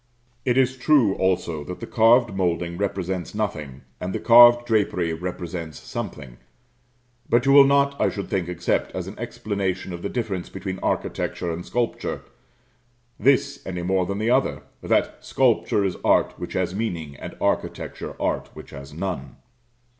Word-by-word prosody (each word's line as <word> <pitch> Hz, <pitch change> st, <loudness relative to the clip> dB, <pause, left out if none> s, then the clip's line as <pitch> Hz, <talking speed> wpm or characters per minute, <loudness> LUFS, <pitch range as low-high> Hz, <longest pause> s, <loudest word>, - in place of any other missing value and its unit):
It 125 Hz, -1 st, +2 dB
is 130 Hz, 0 st, +2 dB
true, 125 Hz, -6 st, +4 dB
also, 90 Hz, -5 st, 0 dB
that 90 Hz, -, -7 dB
the 115 Hz, -, -5 dB
carved 115 Hz, 0 st, +4 dB
moulding 85 Hz, -2 st, -1 dB
represents 95 Hz, -1 st, -3 dB
nothing, 75 Hz, -11 st, -3 dB, 0.2 s
and 90 Hz, +1 st, -4 dB
the -, -, -1 dB
carved 120 Hz, 0 st, +7 dB
drapery 100 Hz, -7 st, +1 dB
represents 85 Hz, -2 st, -5 dB
something; 65 Hz, -4 st, -7 dB, 0.9 s
but 120 Hz, +2 st, +3 dB
you 135 Hz, -, +4 dB
will 140 Hz, 0 st, +9 dB
not, 140 Hz, 0 st, +2 dB
I -, -, +4 dB
should 100 Hz, -, -5 dB
think, 90 Hz, -3 st, -2 dB
accept, 90 Hz, 0 st, -1 dB
as -, -, -3 dB
an -, -, -7 dB
explanation 95 Hz, -3 st, -3 dB
of 85 Hz, -, -6 dB
the 100 Hz, -, -3 dB
difference 100 Hz, -7 st, -3 dB
between 95 Hz, 0 st, -5 dB
architecture 85 Hz, -, -2 dB
and 85 Hz, +2 st, -5 dB
sculpture, 120 Hz, +3 st, -2 dB, 1.0 s
this 125 Hz, -, +2 dB
any 90 Hz, -2 st, -5 dB
more 95 Hz, 0 st, +1 dB
than 100 Hz, -, -3 dB
the 110 Hz, +3 st, 0 dB
other, 130 Hz, +2 st, +1 dB, 0.2 s
that -, -, 0 dB
"sculpture 100 Hz, -, +2 dB
is 95 Hz, -, -1 dB
art -, -, +3 dB
which -, -, -7 dB
has -, -, -1 dB
meaning, 85 Hz, -9 st, -3 dB
and -, -, -9 dB
architecture -, -, -2 dB
art -, -, -1 dB
which -, -, -11 dB
has 70 Hz, +1 st, -10 dB
none." 80 Hz, -7 st, -4 dB
95 Hz, 160 wpm, -24 LUFS, 85-115 Hz, 1.0 s, will